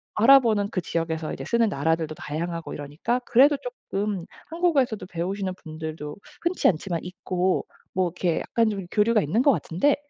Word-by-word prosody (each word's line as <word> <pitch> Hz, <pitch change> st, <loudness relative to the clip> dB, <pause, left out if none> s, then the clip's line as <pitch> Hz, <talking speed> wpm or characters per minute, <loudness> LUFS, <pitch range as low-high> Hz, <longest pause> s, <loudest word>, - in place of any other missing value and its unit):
아랍어는 225 Hz, -4 st, +5 dB
그 185 Hz, -, -1 dB
지역에서 165 Hz, -2 st, -2 dB
이제 -, -, -6 dB
쓰는 235 Hz, -2 st, +2 dB
나라들도 160 Hz, +1 st, 0 dB
다양하고 165 Hz, +3 st, -4 dB
이러니까 150 Hz, -, -2 dB
그래도 275 Hz, +4 st, +5 dB, 0.3 s
쪼끔 200 Hz, -3 st, -1 dB, 0.2 s
한국어에서도 305 Hz, -, +1 dB
배우시는 185 Hz, +2 st, -3 dB
분들도 155 Hz, -1 st, -6 dB, 0.3 s
흔치 345 Hz, +2 st, +2 dB
않지만 170 Hz, 0 st, 0 dB
있고 180 Hz, 0 st, -1 dB, 0.3 s
뭐 185 Hz, -1 st, +2 dB
이렇게 175 Hz, -1 st, -1 dB
약간 230 Hz, -2 st, +1 dB
좀 195 Hz, -3 st, -4 dB
교류가 215 Hz, 0 st, +3 dB
있는 205 Hz, -, +1 dB
것 280 Hz, -, +6 dB
같은데 240 Hz, -, +1 dB
185 Hz, 390 characters per minute, -25 LUFS, 165-230 Hz, 0.3 s, 것